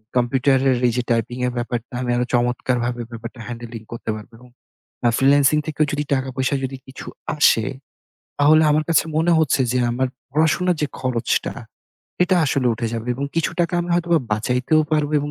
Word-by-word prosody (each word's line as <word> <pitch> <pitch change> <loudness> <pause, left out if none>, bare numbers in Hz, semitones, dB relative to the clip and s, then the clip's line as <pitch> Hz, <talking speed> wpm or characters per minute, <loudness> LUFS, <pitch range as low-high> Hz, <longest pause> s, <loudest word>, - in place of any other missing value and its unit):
কম্পিউটারের 130 +1 +2
এইযে 120 +1 -1
টাইপিং 115 +2 0
এর 125 - -3
ব্যাপারটা 120 0 -4
আমি 125 - -3
আরো 125 0 +1
চমৎকারভাবে 120 0 0
ব্যাপারটা 115 +2 -8
হ্যান্ডেলিং 120 -1 -7
করতে 115 -1 -6
পারবো। 110 +2 -10
এবং 125 - -16 0.6
আ - - +5
ফ্রিল্যান্সিং 140 +2 +4
থেকেও 155 0 +1
যদি 145 0 -1
টাকা 130 -1 -1
পয়সা 130 +2 0
যদি 135 +1 -6
কিছু 130 - -10 0.3
আসে, 115 -6 +4 0.7
তাহলে 155 +2 +5
আমার 155 +1 +2
কাছে 165 - +4
মনে 165 +2 +3
হচ্ছে 155 -3 +2
যে 130 - +1
আমার 130 +2 0 0.2
পড়াশোনার 160 +4 +2
যে 150 - +2
খরচটা 125 -3 -1 0.7
এটা 180 +1 +3
আসলে 135 -1 +1
উঠে 115 +1 -3
যাবে। 115 0 -4
এবং 140 +3 -3
কিছু 165 - +1
টাকা 175 +1 0
আমি 175 - -5
হয়তোবা 170 -1 +2
বাঁচাইতেও 125 +8 +1
পারবো 150 -1 +1
এবং 145 +1 -4
130 Hz, 175 wpm, -21 LUFS, 120-150 Hz, 0.7 s, আ